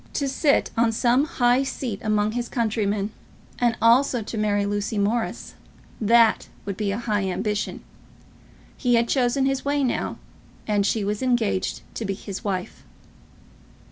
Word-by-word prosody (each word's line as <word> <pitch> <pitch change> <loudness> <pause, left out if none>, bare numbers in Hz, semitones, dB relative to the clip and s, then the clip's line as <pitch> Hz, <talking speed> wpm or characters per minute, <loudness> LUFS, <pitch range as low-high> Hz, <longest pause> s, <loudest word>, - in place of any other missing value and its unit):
To 280 - -1
sit 280 +2 +2
on 230 0 +3
some 245 +4 +2
high 250 -5 +2
seat 255 -6 -4
among 215 0 +1
his 240 +1 -3
countrymen, 210 -3 -1 0.5
and 240 -2 +2
also 240 +1 +4
to 225 - -6
marry 205 -1 +1
Lucy 205 +1 -2
Morris, 220 +3 -1 0.5
that 230 +1 +4 0.2
would 200 -1 -3
be 210 0 -2
a 200 - -2
high 210 -4 -1
ambition. 210 +3 -2 0.9
He 245 -2 +2
had 235 0 +2
chosen 265 +1 +2
his 270 0 0
way 285 0 +1
now, 250 - -1 0.5
and 205 -2 +1
she 220 0 0
was 205 +1 -2
engaged 240 -7 0
to - - -4
be 195 -2 -2
his 195 -1 -7
wife. 185 -3 -4
225 Hz, 150 wpm, -24 LUFS, 205-245 Hz, 0.9 s, also